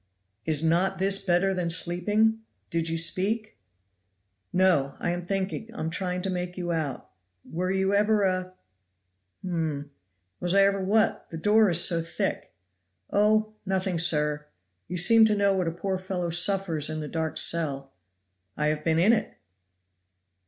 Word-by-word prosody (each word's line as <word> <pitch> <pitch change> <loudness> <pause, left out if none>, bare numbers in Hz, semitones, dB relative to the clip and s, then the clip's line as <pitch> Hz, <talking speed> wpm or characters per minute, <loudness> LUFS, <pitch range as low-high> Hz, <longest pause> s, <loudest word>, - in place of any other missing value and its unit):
"Is 155 -1 +2
not 180 +4 +1
this 195 +1 +1
better 190 +1 +2
than 180 -2 -2
sleeping? 205 +6 +1 0.3
Did 165 0 0
you 165 - -1
speak?" 200 +7 0 0.9
"No! 175 -7 +2
I - - -2
am 175 0 -4
thinking! 195 +4 -3
I - - -8
am 160 - -3
trying 180 0 -2
to 195 - -2
make 180 0 -4
you 175 -1 -3
out. 155 -5 -4 0.3
Were 180 +3 -3
you 190 +1 0
ever 210 +1 +2
a 185 -1 -1 0.9
p - - -5
(hum)?" 155 -5 -3 0.5
"Was 175 +2 -1
I 200 - +6
ever 195 -1 +1
what? 215 +3 +1
the 165 - -7
door 210 +5 +4
is 175 0 +4
so 170 -2 +1
thick!" 165 - -2 0.6
"Oh! 215 +1 +2
nothing, 190 -3 -1
sir; 150 -2 0 0.4
you 180 - -4
seem 225 +6 +5
to 215 -1 +2
know 200 -1 +2
what 185 -3 -1
a - - 0
poor 185 +3 -3
fellow 185 -2 -3
suffers 170 -4 +1
in 155 0 -4
the 150 - -5
dark 160 0 -3
cell." 140 -5 0 0.6
"I 150 0 +1
have 150 0 -2
been 160 0 +1
in 195 +7 +5
it!" 220 - -2
180 Hz, 165 wpm, -26 LUFS, 165-195 Hz, 0.9 s, I